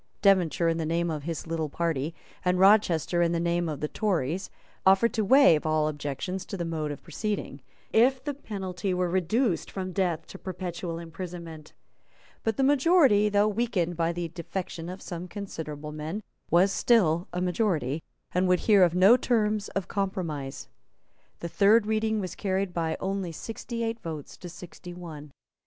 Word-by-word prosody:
Devonshire, 180 -4 +4
in 165 0 +1
the - - -1
name 165 +1 0
of 150 -2 -5
his 165 -1 -4
little 160 -2 -2
party, 160 -1 -2 0.3
and 180 0 +2
Rochester, 185 -4 +4
in 170 0 +2
the 170 - 0
name 170 0 0
of 150 -3 -5
the 150 - 0
Tories, 180 -2 -1 0.3
offered 195 +5 +4
to 220 - +1
waive 235 - +6
all 155 -1 +1
objections 150 +5 -4
to 195 - -5
the 170 - -2
mode 160 -2 -2
of 145 - -7
proceeding, 170 -4 -4 0.3
if 255 +3 +4
the 290 - -2
penalty 190 -7 -4
were 180 0 +1
reduced 190 +3 +1
from 185 -1 -4
death 175 -4 -1
to 195 - -11
perpetual 180 -2 -5
imprisonment. 170 -2 -8 0.7
But 225 -2 0
the 270 - +2
majority, 275 - +5
though 205 0 +3
weakened 205 -6 0
by 165 0 +1
the 170 -1 -4
defection 170 0 -5
of 185 +1 -8
some 175 0 -6
considerable 160 -7 -6
men, 155 +8 -5 0.3
was 180 +3 +4
still 180 -8 +3
a 180 - -3
majority, 175 - 0 0.3
and 185 +1 +1
would 180 -1 +3
hear 205 -3 +5
of 175 -1 +4
no 195 +7 +7
terms 215 -4 +1
of 195 -2 -1
compromise. 170 -9 -3 0.7
The 170 - -3
third 205 +5 +4
reading 220 0 0
was 185 -3 -4
carried 190 -1 -1
by 165 -2 -1
only 190 -2 -2
sixty 230 +6 -5
eight 225 0 -2
votes 160 -7 -7
to 180 - -9
sixty 175 +1 -10
one. 155 -4 -9
180 Hz, 170 wpm, -27 LUFS, 165-205 Hz, 0.7 s, no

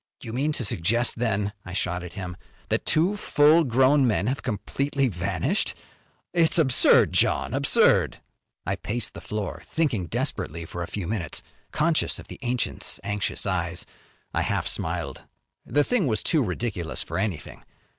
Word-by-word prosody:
"You 110 - -6
mean 140 +5 0
to 125 - -2
suggest 115 +5 +2
then," 105 -4 0
I 95 - -8
shot 90 -2 -1
at 90 -1 -8
him, 90 -3 -6 0.3
"that - - -1
two 175 +6 +2
full 155 -4 +4
grown 130 +1 +4
men 105 -3 +1
have 130 +5 -1
completely 135 +4 -1
vanished? 95 -2 -1 0.6
It's 170 -2 +3
absurd, 135 -7 +5
John, - - +2
absurd!" - - +3 0.5
I - - -1
paced 115 +2 -3
the - - -9
floor 105 -3 -4
thinking 120 - -1
desperately 85 +1 -3
for 85 +2 -6
a 85 - -3
few 100 -4 -5
minutes, 100 -2 -3 0.3
conscious 155 +1 +1
of - - -11
the - - -9
ancient's 125 -2 -1
anxious 105 -1 -2
eyes. 85 -3 -2 0.5
I - - +1
half - - -1
smiled. - - -2 0.5
The 145 +5 +3
thing 210 - +1
was 110 -3 +1
too 160 -4 +3
ridiculous 95 -5 -3
for - - -4
anything. 95 -8 -3
115 Hz, 155 wpm, -25 LUFS, 95-140 Hz, 0.6 s, absurd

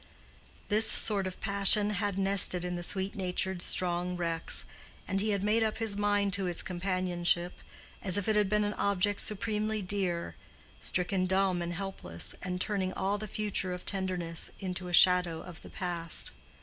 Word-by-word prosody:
This 215 +1 +6
sort 200 -3 +2
of 185 - -8
passion 200 +1 +3
had 205 -1 -2
nested 195 -2 +5
in 180 0 -3
the 175 - -4
sweet 190 +2 -1
natured, 190 -2 -2
strong 180 0 -1
Rex, 165 -2 +2 0.4
and 195 0 0
he 215 - 0
had 200 -2 0
made 215 +2 +2
up 220 -1 0
his 220 -3 0
mind 205 -1 +1
to 190 -1 0
its 175 -1 -1
companionship, 180 -1 -1 0.5
as 185 -1 +1
if 205 - -2
it 220 - +2
had 210 -2 +2
been 210 +1 +2
an 205 0 -1
object 200 0 +1
supremely 215 0 0
dear, 180 -3 -2 0.5
stricken 185 +1 -1
dumb 190 -1 +1
and 175 0 -3
helpless, 175 - -4
and 180 0 -4
turning 190 -2 -1
all 200 +2 -1
the 215 - -5
future 200 -3 -2
of 180 - -8
tenderness 180 -4 -3
into 185 -1 -3
a - - -6
shadow 180 -2 +4
of 175 -2 -11
the - - -12
past. 170 -3 0
190 Hz, 175 wpm, -30 LUFS, 180-205 Hz, 0.5 s, This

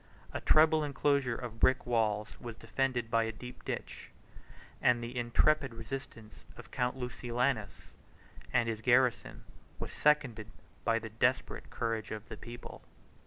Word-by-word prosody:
A - - -3
treble 155 0 +5
enclosure 140 -3 +1
of 115 -2 -7
brick 130 +2 +4
walls 110 -3 +1
was 120 -2 -7
defended 125 -4 -1
by 115 0 +3
a 115 - -2
deep 125 +3 -10
ditch; - - -5 0.7
64 - - +4
and 120 -1 +2
the 120 +2 -6
intrepid 125 +2 +2
resistance 115 -2 -8
of - - -12
Count 125 +1 -1
Lucilianus, 125 -3 -2 0.6
and 120 -1 +3
his 110 -1 -2
garrison, 125 0 +2 0.3
was - - -6
seconded 130 -8 +2 0.3
by 115 -1 +3
the 115 -1 -6
desperate 120 +4 0
courage 115 -2 -2
of 110 0 -6
the - - -7
people. 120 0 -9
120 Hz, 145 wpm, -32 LUFS, 115-130 Hz, 0.7 s, treble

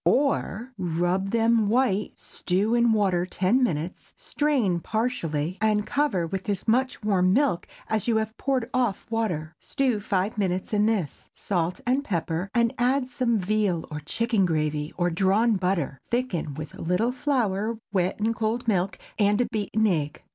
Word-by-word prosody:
Or, 260 -3 +1
Rub 175 +2 0
them 225 -1 +3
white, 220 -4 +1
stew 195 +5 -1
in 235 -1 +4
water 195 -5 +2
ten 190 +8 +1
minutes; 170 -5 -3
strain 255 - 0
partially, 180 -7 -2
and 210 -1 +2
cover 260 - 0
with 190 +4 -4
as 200 0 -2
much 255 +1 +1
warm 185 -3 +3
milk 270 -7 +1 0.2
as 220 -1 -1
you 230 -2 +3
have 220 0 -2
poured 260 -4 -1
off 245 -6 0
water; 175 -9 -2
stew 260 -6 0
five 200 +2 -1
minutes 185 +1 -1
in 210 0 +3
this; 200 -10 -2
salt 175 -2 -2
and 260 +3 +1
pepper, 175 - -2
and 235 -1 +3
add 255 +1 +2
some 240 -3 +1
veal 200 -3 0
or 150 - -4
chicken 225 - 0
gravy, 150 -3 0
or 175 -1 +1
drawn 200 +6 +3
butter. 180 -7 -1
Thicken 235 - -1
with 155 0 -7
a - - -10
little 180 +8 +1
flour 230 -5 0 0.2
wet 185 0 0
in 220 +2 +1
cold 230 +2 -2
milk, 190 -2 +1 0.2
and 205 +1 +3
a - - +2
beaten 220 0 0
egg. 155 -7 -1
210 Hz, 160 wpm, -26 LUFS, 180-235 Hz, 0.2 s, in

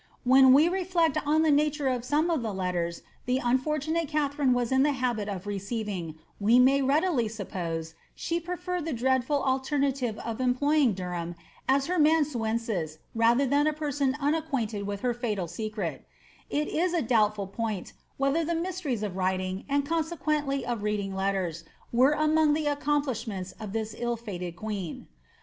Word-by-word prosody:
'' - - -39
When 265 -1 +8
we 290 +5 +7
reflect 350 -4 +1
on 310 +2 +4
the 315 - +4
nature 295 0 +2
of 250 -2 0
some 300 +6 +1
of 320 -6 +1
the 220 -4 -3
letters 175 -2 -2 0.2
the 250 +1 +2
onfortunatb 300 +6 0
Katharine 285 -3 +1
was 245 -1 +1
in 265 0 +4
the 290 +1 +3
habit 240 -5 -1
of 195 -1 -5
receiving, 200 -4 -4 0.2
we 220 +4 +4
may 265 +2 +5
readily 275 -2 +2
suppose 170 -6 -4 0.2
she 335 0 -2
preferred 360 0 -4
the 325 - -2
dreadful 260 +3 +1
alternative 265 -3 0
of 230 +2 -3
employing 260 0 +3
Derham 175 -2 -4 0.3
as 270 +1 +3
her 360 +2 0
amanuensis 230 - +1 0.2
rather 235 +4 +3
than 285 +3 +2
a 310 - +2
person 285 -3 -1
unacquainted 275 -9 -1
with 200 0 -4
her 250 -1 +1
fatal 215 -7 -2
secret, 185 - -4 0.5
h 300 +1 0
is 350 +2 0
a 330 - +1
doubtful 215 -3 +2
point, 205 -1 -4 0.2
whether 275 +4 +1
the 335 +2 -1
'^ 330 - -1
mysteries 335 - -3
of 200 -4 -3
writing," 185 0 -1
and 280 0 +1
conse 325 +2 -1
quently 285 -3 0
of 235 -3 -3
reading 205 -2 -1
letters, 190 -4 -1 0.3
were 260 +5 +5
among 310 0 +3
the 310 0 -1
accomplishments 260 -10 -1
of 215 -3 -6
this 220 0 -3
ill 240 0 -2
fated 180 -6 -6
queen. 200 -5 -5
255 Hz, 170 wpm, -28 LUFS, 205-295 Hz, 0.5 s, When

